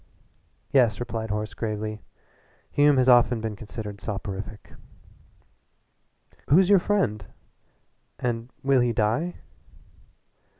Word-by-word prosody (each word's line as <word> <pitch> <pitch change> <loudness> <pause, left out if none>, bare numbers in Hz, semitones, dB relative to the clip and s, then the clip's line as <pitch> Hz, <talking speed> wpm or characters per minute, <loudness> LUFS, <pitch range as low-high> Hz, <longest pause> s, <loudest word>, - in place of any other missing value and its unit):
"Yes," 120 -6 +3
replied 115 -2 -4
Horace 105 0 -3
gravely, 110 0 -4 0.7
"Hume 145 -1 +4
has 130 0 +3
often 120 -1 +5
been 110 -1 -4
considered 105 -1 -8
soporific 100 0 -6 0.9
" - - -37
"Who's 180 +7 +5
your 200 - +7
friend 140 - 0 0.9
and 120 -1 -3
will 135 -1 +4
he 120 -1 +1
die?" 115 +11 0
115 Hz, 100 wpm, -25 LUFS, 105-130 Hz, 0.9 s, your